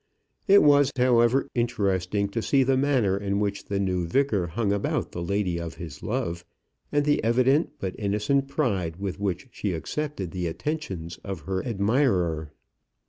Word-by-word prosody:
It 200 0 +7
was, 145 -2 +5
however, 125 +1 +3
interesting 100 -4 0
to 115 +3 -2
see 135 +4 +3
the 135 +1 +2
manner 130 -8 +2
in 100 0 -1
which 100 -1 -2
the 100 -1 -2
new 90 -3 0
vicar 105 -4 +1
hung 100 +4 0
about 100 - -1
the 85 - -5
lady 90 -1 -1
of 85 -1 -6
his 80 -4 -8
love, 85 +1 -2 0.5
and 145 0 +2
the 145 0 +2
evident 130 +7 +3
but 95 -1 -4
innocent 105 +7 +1
pride 100 - -1
with 95 +1 -5
which 100 +3 -3
she 100 -5 -3
accepted 95 - -4
the 90 -2 -2
attentions 90 - -4
of 95 -5 -5
her 95 +4 -3
admirer. 100 - +1
100 Hz, 160 wpm, -26 LUFS, 90-130 Hz, 0.5 s, It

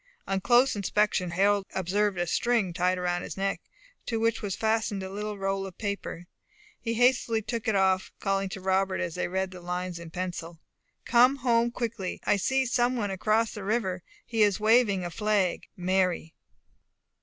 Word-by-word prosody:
On 195 0 0
close 245 +5 +4
inspection, 205 -2 +1
Harold 195 +3 +2
observed 195 +2 0
a 175 - 0
string 215 0 +1
tied 180 +1 +1
round 175 -1 -1
his - - -7
neck, 195 0 -1 0.5
to 225 -2 -1
which 230 0 +1
was 200 -4 -3
fastened 220 -2 0
a 190 - -6
little 210 +1 -4
roll 195 0 -1
of 185 - -12
paper. 200 -4 -4 0.5
He 230 0 -2
hastily 240 -2 +2
took 230 +1 -4
it 220 - +2
off, 190 -1 +2
and - - -39
calling 195 -1 0
to 190 - -7
Robert, 190 0 +1 0.2
they 180 - -2
read 190 +1 -2
these 180 -1 -10
lines 180 0 -4
in 170 -1 -9
pencil: 175 -1 -5 0.5
"Come 250 +3 +5
home 240 -3 +2
quickly. 230 -6 -4
I 205 - +2
see 265 +7 +1
some 245 0 +1
one 205 -5 -1
across 215 +4 +1
the 210 - -7
river; 195 -3 -1 0.2
he 225 -2 -1
is 205 -2 +4
waving 215 -4 +3
a 175 - -4
flag. 210 -3 0
Mary." 180 -2 0
195 Hz, 180 wpm, -28 LUFS, 185-225 Hz, 0.5 s, Come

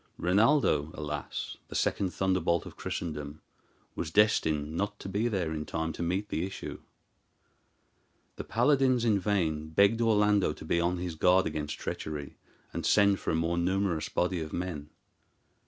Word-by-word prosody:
Rinaldo, 100 - +3
alas! 75 -2 -5
the - - -9
second 95 -2 0
thunderbolt 95 -3 +1
of - - -10
Christendom, 75 -3 -5 0.6
was 80 - -3
destined 80 -6 +2
not 100 +3 -2
to - - -6
be 100 +4 0
there 90 -8 -1
in 75 -1 -3
time 80 +1 -3
to - - -7
meet 95 +5 -1
the 80 - -1
issue. 95 +1 -6 1.6
The - - -4
paladins 130 0 +2
in 105 -3 +3
vain 85 -6 0
begged 100 +7 +3
Orlando 105 -6 +3
to - - -11
be 85 +2 +1
on 90 +1 +1
his 90 -1 -4
guard 90 +4 +4
against 75 -1 -3
treachery, 75 -2 -5 0.4
and - - -3
send 100 -2 +4
for - - -4
a - - +1
more 85 +1 0
numerous 90 -2 0
body 90 -1 0
of 80 0 -5
men. 85 -5 -4
90 Hz, 155 wpm, -29 LUFS, 80-100 Hz, 1.6 s, guard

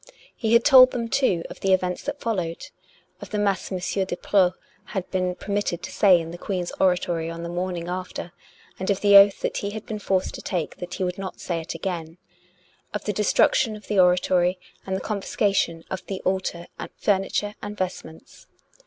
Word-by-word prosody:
He 225 -1 0
had 235 0 +5
told 260 -3 +9
them, 235 -2 -3
too, 205 -11 +1
of - - -10
the 195 -1 +2
events 180 -1 0
that 290 - -4
followed; 180 -8 -3 0.5
of 205 - -8
the 210 - -3
mass 200 -2 0
M. 190 - -1
de 185 0 -2
Preau 185 -3 +3 0.4
had 185 - -2
been 185 -1 0
permitted 200 -4 -2
to - - -6
say 190 -4 +5
in 165 0 -6
the 175 - -9
Queen's 180 -3 -3
oratory 175 -3 +1
on 165 0 -6
the 170 - -4
morning 175 -1 -3
after; 180 -1 -5 0.5
and 190 - -3
of 200 -1 +1
the 205 -1 +5
oath 200 0 +8
that - - -1
he 200 - -2
had 215 +1 -7
been 215 -1 -5
forced 190 -2 0
to - - -7
take 175 -5 -3
that 180 0 -6
he - - -2
would 180 +1 -2
not 190 -1 -6
say 170 -2 -3
it 160 - -6
again; 170 -3 -4 0.8
of 210 - -3
the 210 - -1
destruction 215 +2 +3
of 210 - -12
the 205 - +2
oratory 180 0 +3 0.3
and 190 - -1
the 190 - -3
con 210 -2 -3
fiscation 190 -6 0
of 190 - -4
the 190 -1 -4
altar 185 -2 -2 0.3
furniture 205 +1 0
and 210 0 -6
vestments. 180 -4 -6
190 Hz, 200 wpm, -24 LUFS, 180-205 Hz, 0.8 s, told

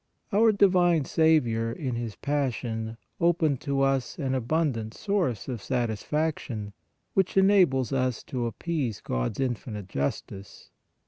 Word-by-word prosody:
Our 220 +2 +5
Divine 180 -6 +4
Saviour 125 -9 +2
in 130 0 -3
His 115 -2 -4
Passion 120 -6 -2 0.2
opened 165 -5 +2
to 140 -1 -1
us 135 -2 +1
an 135 -5 -1
abundant 130 -4 -1
source 180 - -1
of 125 -5 -4
satisfaction, 120 -2 -2 0.4
which 190 0 +1
enables 180 - +4
us 130 -2 0
to 120 -3 -3
appease 130 -3 -2
God - - -2
s - - -4
infinite 115 -6 -3
justice. 95 +6 -5
130 Hz, 125 wpm, -27 LUFS, 115-160 Hz, 0.4 s, Our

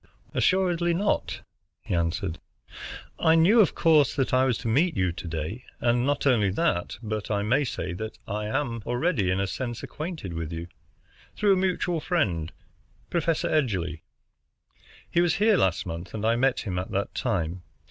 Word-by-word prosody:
"Assuredly 175 -2 +2
not," 205 +4 0 0.4
he - - -4
answered. 85 +1 -1 0.8
"I 160 0 +5
knew, 180 +8 +5
of 205 - +4
course, 155 -5 +4
that 135 -2 0
I 130 +1 +4
was 125 -3 +1
to - - -5
meet 150 +8 +2
you 90 -2 +2
to 85 +1 -7
day. 80 +9 -4 0.2
And 120 +2 +2
not 145 0 0
only 115 -7 +4
that, 95 - 0
but 110 -1 -3
I 100 -1 0
may 125 +8 +2
say 90 -9 -3 0.3
I 105 0 -3
am 120 -1 -1
already 120 - +1
in 95 +1 +1
a 100 - +1
sense 120 +4 -4
acquainted 155 - -5
with 80 -1 -4
you, 85 0 -4 0.7
through 205 -2 +4
a - - +2
mutual 180 -2 0
friend, 90 - 0 0.6
Professor 165 -2 +1
Edgerly. 95 - 0 1.1
He 170 - +3
was 175 -2 +2
here 215 +1 +4
last 95 - +1
month, 85 +3 -6
and 110 0 -3
I 115 +1 +3
met 130 +1 +2
him 90 -4 -3
at 90 - -5
that 100 +1 -2
time. 90 -7 -1
120 Hz, 170 wpm, -26 LUFS, -, 1.1 s, I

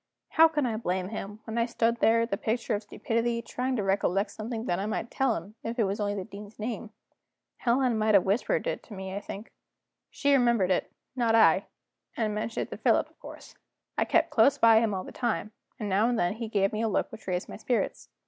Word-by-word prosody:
How 325 +1 +7
can 300 -4 -1
I 225 -3 -1
blame 185 -3 -2
him, 210 0 -6
when 225 +1 -3
I 230 - +2
stood 235 -1 +1
there 230 0 +4
the 230 - -2
picture 225 +3 -1
of 205 - -1
stupidity, 230 +2 -1
trying 255 +2 -2
to 215 - -1
recollect 195 +1 +1
something 225 +1 -5
that 175 -6 0
I 200 - -2
might 220 +2 -3
tell 265 -4 +1
him, 205 - -7
if 230 +2 -4
it 230 - +3
was 200 +1 -1
only 205 -1 -1
the 195 - -3
Dean's 205 +1 -11
name? 225 0 -4 0.7
Helena 250 0 +2
might 215 -1 +3
have 190 - +6
whispered 200 +5 +1
it - - -2
to 215 - -10
me, 190 0 -6
I 200 - -2
think. 205 +1 -8 0.6
She 285 -1 +1
remembered 235 -8 +3
it, 185 - 0 0.2
not 235 -3 +2
I 225 - +5 0.5
and 215 -2 0
mentioned 215 +2 -2
it - - -22
to - - -5
Philip, - - +2
of - - -33
course. - - -11 0.4
I - - +1
kept - - +2
close 280 - +4
by 225 -1 +6
him 220 -3 0
all 185 - -3
the - - -9
time, 225 -3 -2 0.3
and 210 - -3
now 205 +4 +3
and 245 - 0
then 175 -1 +1
he 225 +1 -5
gave 195 -2 +1
me 215 - -1
a 225 - +1
look - - 0
which 220 -2 -11
raised 180 -1 -1
my - - -8
spirits. 240 +3 -2
220 Hz, 235 wpm, -28 LUFS, 200-235 Hz, 0.7 s, How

